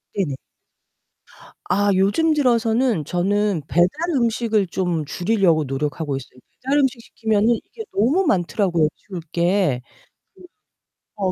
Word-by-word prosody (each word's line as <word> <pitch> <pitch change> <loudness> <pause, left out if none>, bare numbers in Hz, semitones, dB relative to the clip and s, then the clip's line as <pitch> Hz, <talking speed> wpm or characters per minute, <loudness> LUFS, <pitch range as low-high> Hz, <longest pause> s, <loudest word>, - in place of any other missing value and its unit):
네네. 175 -9 -1 1.3
아, 205 +1 +2
요즘 205 - +2
들어서는 235 - +1
저는 195 +2 0
배달 175 +1 +4 0.3
음식을 225 -4 +1
좀 175 -3 -2
줄이려고 175 -1 +1
노력하고 145 +2 -3
있어요. 125 -1 -9 0.2
배달 275 +3 +1
음식 265 -3 +1
시키면은 220 -1 0
이게 450 - -10
너무 280 - +2
많더라고요. 175 - +1
치울 185 -4 -9
게. 170 -6 +1 1.4
음. - - -3
어, 185 - +1
195 Hz, 265 characters per minute, -21 LUFS, 170-230 Hz, 1.4 s, 배달